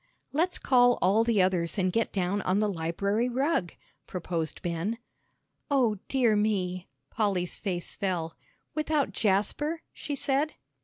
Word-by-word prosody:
"Let's 340 +5 +1
call 245 -2 +4
all 200 +5 +4
the 225 -5 +3
others 180 -2 0
and 185 -2 +1
get 230 - +1
down 195 +1 0
on 185 +2 +1
the 215 - +2
library 200 +6 0
rug," 265 - 0 0.4
proposed 170 -3 -3
Ben. 175 +6 -2 0.7
"O 245 -8 +2
dear 245 -5 +3
me!" 185 -4 0 0.2
Polly's 195 -5 0
face 180 -4 -3
fell. 175 -4 -2 0.4
"Without 305 -2 0
Jasper?" 230 - 0
she 290 - -4
said. 280 +2 0
205 Hz, 135 wpm, -28 LUFS, 180-250 Hz, 0.7 s, call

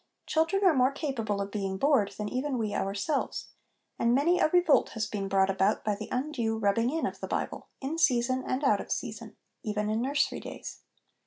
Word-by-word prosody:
Children 325 +5 +1
are 370 -4 +6
more 260 -1 +3
capable 230 -9 -2
of 200 0 -4
being 195 -2 -2
bored 260 -6 +3
than 210 - -3
even 260 +4 -2
we 215 -3 -2
ourselves, 200 +9 -2 0.5
and 235 +1 +3
many 340 +6 +3
a - - +5
revolt 350 -3 +4
has 220 -1 0
been 205 -2 -3
brought 195 0 +3
about 195 +2 +1
by 210 - +2
the 210 +1 -6
undue 250 -4 -1
rubbing 220 +3 +2
in 320 +4 -1
of - - -4
the - - -5
Bible, - - -3
in 295 +5 -3
season 255 -3 +2
and 255 +3 -2
out 275 - +3
of - - -9
season, - - -4 0.2
even 210 -1 -2
in 220 +1 0
nursery 275 +3 0
days. - - -8
240 Hz, 195 wpm, -29 LUFS, 210-285 Hz, 0.5 s, are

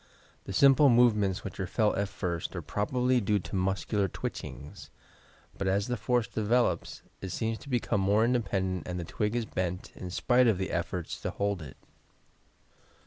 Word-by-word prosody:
The - - -6
simple 140 +7 +6
movements 105 -5 +3
which 100 - -7
are 95 - -2
felt 105 +3 +1
at 100 0 -1
first 90 -3 -3
are - - -4
probably 125 +4 +1
due 105 +1 +2
to 100 - -5
muscular 95 +2 0
twitchings, 70 -5 -7 0.7
but 100 - -3
aa 95 +1 +3
the 115 +5 -1
force 120 +1 +1
develops 110 -5 0 0.2
it 95 - -5
seems 110 +5 -2
to 140 - -12
become 120 -5 0
more 105 +3 +3
independent 95 -7 -1
and 90 0 -3
the - - -3
twig 105 +6 -2
is 120 -2 0
bent 90 -3 -3
in 90 - -7
spite 125 +7 +3
of 110 -5 +3
the 95 0 -3
efforts 85 0 -3
to - - -2
hold 100 -2 -1
it. 70 -4 -10
100 Hz, 175 wpm, -29 LUFS, 95-120 Hz, 0.7 s, simple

